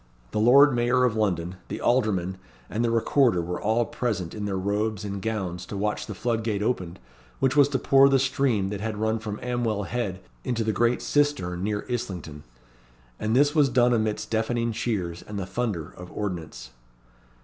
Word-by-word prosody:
The - - -1
Lord 135 +5 +7
Mayor 120 +1 +2
of 120 -3 +2
London, 90 -4 -1
the - - -5
Aldermen, 95 -7 +1 0.3
and 115 +3 0
the 120 - +2
Recorder 115 -2 +3
were 85 +1 -3
all 110 +3 +2
present 105 -10 -3
in 105 -1 -4
their 100 -2 -2
robes 105 +2 -1
and 100 -1 -4
gowns 95 -5 -3
to 100 - -5
watch 105 +1 -2
the 105 - -6
floodgate 110 -1 -1
opened, 95 -7 -2 0.4
which 135 0 +2
was 145 -1 +6
to 140 - 0
pour 135 +1 +5
the 135 - +4
stream 130 -6 +1
that 100 -1 -4
had 110 -1 -3
run 110 +1 0
from 105 -1 -5
Amwell 120 -4 -1
Head 100 -4 -3 0.2
into 120 -3 -1
the 110 0 0
great 120 +2 +1
cistern 95 -12 0
near 105 0 -2
Islington. 95 -12 -4 0.8
And 110 +2 0
this 145 +2 +4
was 150 -4 +4
done 125 -1 +3
amidst 110 -2 -1
deafening 115 +1 0
cheers 95 -7 -2
and 105 - -7
the 95 - -3
thunder 95 -7 -3
of 90 0 -10
ordnance. 80 -12 -5
110 Hz, 180 wpm, -26 LUFS, 95-120 Hz, 0.8 s, Lord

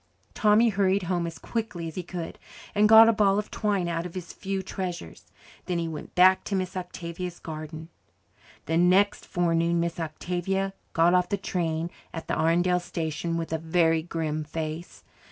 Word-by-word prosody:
Tommy 215 +1 +4
hurried 195 -1 +2
home 175 -1 -1
as 165 - -7
quickly 220 -8 -4
as 160 - -7
he 185 - -3
could 175 -1 -7 0.3
and 210 0 +4
got 225 0 +10
a 230 - +5
ball 200 -2 +3
of 210 - -3
twine 200 -5 0
out 165 -1 -1
of 180 0 -8
his 180 -2 -6
few 195 -1 -3
treasures. 175 - -6 0.4
Then 180 -2 0
he 170 -1 -1
went 155 -2 -7
back 185 +1 +6
to 200 - -2
Miss 185 0 -2
Octavia's 180 -1 -5
garden. 155 0 -7 0.8
The 160 - 0
next 185 +4 +3
forenoon 170 -1 +1
Miss 170 0 -2
Octavia 180 +4 -2 0.2
got 165 +2 +4
off 180 -1 +3
the 200 - 0
train 170 -3 -2 0.2
at 165 - -6
the - - 0
Arundel 175 +2 +2
station 165 -1 -3
with 165 -1 -3
a 160 - 0
very 165 0 +2
grim 155 -2 -3
face. 155 +2 -6
175 Hz, 175 wpm, -27 LUFS, 165-190 Hz, 0.8 s, got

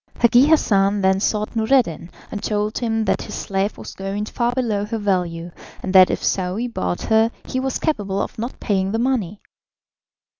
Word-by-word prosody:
Hagi 240 +3 +5
Hassan 205 -10 +3
then 190 0 +3
sought 210 +2 -1
Noureddin, 220 - +1 0.2
and 205 - -4
told 210 0 -1
him 225 -2 0
that - - +1
his - - -7
slave 195 +1 -2
was - - -9
going 195 +2 -4
far 235 +2 -1
below 230 -5 -1
her 225 +2 -3
value, 180 -4 -1 0.3
and 190 - -3
that 185 -1 +8
if - - -2
Saouy 190 +5 -1
bought 90 - -3
her 220 0 +3 0.2
he 260 - -2
was 265 0 -1
capable 205 - -1
of - - -4
not 235 +3 -5
paying 195 -1 0
the - - +1
money. 225 -6 -1
210 Hz, 180 wpm, -21 LUFS, 195-235 Hz, 0.3 s, that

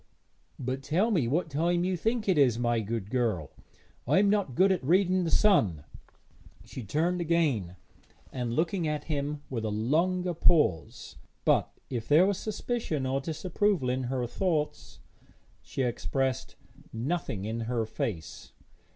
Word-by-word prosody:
'But 130 +1 -3
tell 175 +11 +1
me 155 - +2
what 160 +8 0
time 170 +4 +1
you 185 0 0
think 220 +5 -1
it 190 - +4
is, 130 -6 +4
my 120 -1 +1
good 110 -1 -4
girl; 110 - 0 0.6
I - - +3
am 200 +1 +4
not 200 -12 0
good 190 +5 +5
at 185 -7 0
reading 185 +4 +3
the - - 0
sun.' 110 - +3 0.8
She 130 - -8
turned 170 - 0
again, 150 - +1 0.6
and 120 -2 -3
looked 165 +3 +1
at 155 -5 -1
him 145 -1 -3
with 115 -4 -2
a 110 - -1
longer 170 - +1
pause, 150 - +1 0.3
but, - - +3 0.2
if 115 -3 -3
there 155 +5 +6
was 200 -1 0
suspicion 215 - -2
or 135 +1 0
disapproval 170 0 0
in 130 0 -2
her 125 0 -1
thoughts, 155 +3 -2 0.6
she 135 - -3
expressed 130 +1 -2 0.4
nothing 115 - -3
in 110 +2 -3
her 120 -3 0
face. 105 -6 -5
145 Hz, 150 wpm, -29 LUFS, 120-180 Hz, 0.8 s, there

